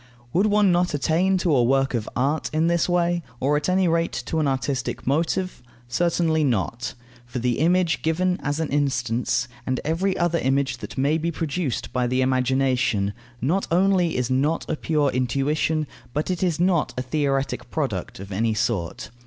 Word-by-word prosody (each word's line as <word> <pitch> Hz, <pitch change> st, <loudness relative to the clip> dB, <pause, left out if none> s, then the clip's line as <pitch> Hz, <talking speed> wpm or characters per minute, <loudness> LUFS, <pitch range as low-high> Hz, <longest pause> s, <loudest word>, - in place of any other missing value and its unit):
Would 190 Hz, +5 st, +3 dB
one 205 Hz, -2 st, +4 dB
not 175 Hz, -2 st, +1 dB
attain 170 Hz, +7 st, +2 dB
to 175 Hz, -5 st, +2 dB
a 125 Hz, -, +4 dB
work 135 Hz, +2 st, +2 dB
of 115 Hz, -3 st, -2 dB
art 140 Hz, +5 st, 0 dB
in 155 Hz, +1 st, +1 dB
this 170 Hz, +1 st, +2 dB
way, 175 Hz, 0 st, +1 dB, 0.2 s
or 140 Hz, +3 st, +2 dB
at 150 Hz, +3 st, 0 dB
any 185 Hz, 0 st, +3 dB
rate 165 Hz, -3 st, +1 dB
to 160 Hz, -, -1 dB
an 150 Hz, -, +1 dB
artistic 130 Hz, -1 st, -2 dB
motive? 165 Hz, +5 st, 0 dB, 0.3 s
Certainly 165 Hz, +2 st, +1 dB
not. 120 Hz, -1 st, -1 dB, 0.3 s
For 120 Hz, -, -5 dB
the 120 Hz, -1 st, 0 dB
image 170 Hz, +1 st, +2 dB
given 180 Hz, +3 st, +1 dB
as 145 Hz, +1 st, -2 dB
an 160 Hz, -, -1 dB
instance, 125 Hz, -4 st, 0 dB, 0.2 s
and 130 Hz, 0 st, -1 dB
every 185 Hz, +5 st, 0 dB
other 170 Hz, -1 st, +1 dB
image 135 Hz, +1 st, +1 dB
that -, -, -8 dB
may 145 Hz, +4 st, +2 dB
be 165 Hz, +2 st, -1 dB
produced 145 Hz, -6 st, -3 dB
by 125 Hz, -1 st, +1 dB
the 130 Hz, +1 st, +1 dB
imagination, 130 Hz, -5 st, +1 dB, 0.3 s
not 170 Hz, +11 st, 0 dB
only 180 Hz, -2 st, +2 dB
is 125 Hz, 0 st, -1 dB
not 145 Hz, +5 st, +1 dB
a -, -, -1 dB
pure 150 Hz, -3 st, +1 dB
intuition, 140 Hz, +5 st, 0 dB, 0.3 s
but 150 Hz, +5 st, -1 dB
it 180 Hz, -, -2 dB
is 175 Hz, -4 st, +1 dB
not 175 Hz, -3 st, +1 dB
a 125 Hz, -, -1 dB
theoretic 135 Hz, -2 st, -1 dB
product 120 Hz, -, -3 dB
of 100 Hz, +1 st, -9 dB
any 110 Hz, +3 st, 0 dB
sort. 105 Hz, -6 st, -2 dB
145 Hz, 175 wpm, -24 LUFS, 125-170 Hz, 0.3 s, one